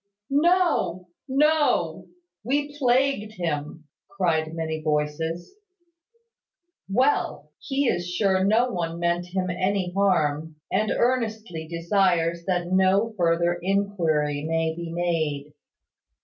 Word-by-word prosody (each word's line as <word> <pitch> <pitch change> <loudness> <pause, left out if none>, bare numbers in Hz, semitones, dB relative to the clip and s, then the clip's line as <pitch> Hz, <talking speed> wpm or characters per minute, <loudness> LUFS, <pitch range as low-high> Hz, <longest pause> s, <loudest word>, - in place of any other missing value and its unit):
"No! 295 - +2 0.2
No! 270 - +2 0.4
We 285 +4 -1
plagued 255 -5 +1
him," 160 -4 -4 0.3
cried 165 -5 0
many 160 -1 -3
voices. 155 - -2 1.4
"Well! 255 +8 0
He 280 0 -1
is 175 -5 -1
sure 190 +1 +1
no 225 +5 +3
one 170 -4 -3
meant 175 +1 0
him 185 0 -2
any 185 0 -1
harm, 160 -6 +1 0.2
and 210 +3 +1
earnestly 220 -9 -1
desires 170 -1 +1
that 180 -1 -1
no 190 +4 +3
further 170 -1 +1
inquiry 170 -7 0
may 160 0 -1
be 170 -1 -6
made. 155 -4 -2
180 Hz, 105 wpm, -25 LUFS, 165-210 Hz, 1.4 s, no